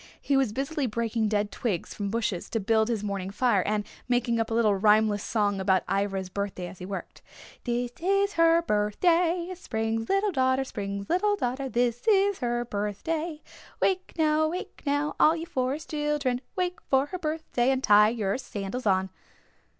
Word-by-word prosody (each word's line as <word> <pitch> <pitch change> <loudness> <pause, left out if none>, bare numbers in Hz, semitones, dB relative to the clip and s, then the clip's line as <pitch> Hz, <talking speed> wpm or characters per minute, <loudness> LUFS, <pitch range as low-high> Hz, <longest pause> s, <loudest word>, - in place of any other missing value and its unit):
He 280 - 0
was 270 -5 +2
busily 275 +4 -2
breaking 225 0 -1
dead 205 -1 0
twigs 200 -8 -3
from 200 -1 -3
bushes 215 -4 -2
to 225 - -1
build 220 +1 +2
his 225 -3 -1
morning 200 -2 -3
fire 205 -1 +2
and 210 0 0 0.2
making 240 -1 +1
up 225 - 0
a - - -2
little 225 -3 +3
rhymeless 210 +1 +3
song 205 -3 0
about 190 -1 +2
Ivra's 195 -1 -1
birthday 195 -1 -4
as 180 +1 -10
he 180 - -7
worked. 195 -1 -7 0.4
This 240 0 -1
is 395 +3 +2
her 330 0 +4
birthday, 335 - +1
Spring's 225 -9 -3
little 390 +1 +2
daughter 260 -3 +2
Spring's 200 -5 -5
little 410 +4 +2
daughter 265 -5 -2
This 240 - 0
is 400 -2 +3
her 240 -1 -1
birthday. 300 - -3 0.4
Wake 370 -1 0
now, 310 0 +3
wake 355 +4 -6
now, 290 +1 0
All 315 - +6
you 330 0 -5
Forest 275 +1 -3
Children, 295 -5 0
Wake 360 -1 -1
for 265 0 +3
her 365 +5 -6
birthday 305 -6 -1
And 265 0 +1
tie 210 +1 +6
your 220 -1 -1
sandals 215 0 -5
on. 190 -1 +2
240 Hz, 175 wpm, -27 LUFS, 210-310 Hz, 0.4 s, All